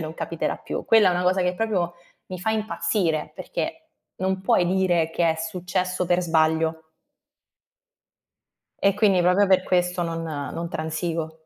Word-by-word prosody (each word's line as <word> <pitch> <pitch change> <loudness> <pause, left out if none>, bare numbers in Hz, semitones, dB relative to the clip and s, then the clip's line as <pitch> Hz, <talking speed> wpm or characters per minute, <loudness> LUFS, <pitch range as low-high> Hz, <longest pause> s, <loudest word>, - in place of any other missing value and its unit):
non 155 -1 -5
capiterà 165 0 -3
più". - - -5
Quella 220 -4 +5
è - - +3
una 180 - 0
cosa 185 +1 +2
che 180 0 0
proprio 180 -5 -1 0.3
mi 185 - -7
fa 200 +5 -1
impazzire 170 -7 -1
perché, 320 - -5 0.3
non 190 0 -1
puoi 180 -2 +3
dire 175 -3 +1
che 170 0 +2
è - - 0
successo 180 +2 -2
per 175 0 +2
sbaglio 160 -1 +1 2.0
E 200 - +5
quindi 200 -3 +3
proprio 180 +3 +4
per 190 -1 +4
questo 180 -1 0
non 165 -1 -3
non 160 +2 -4
transigo. 160 0 -4
180 Hz, 150 wpm, -24 LUFS, 165-185 Hz, 2.0 s, Quella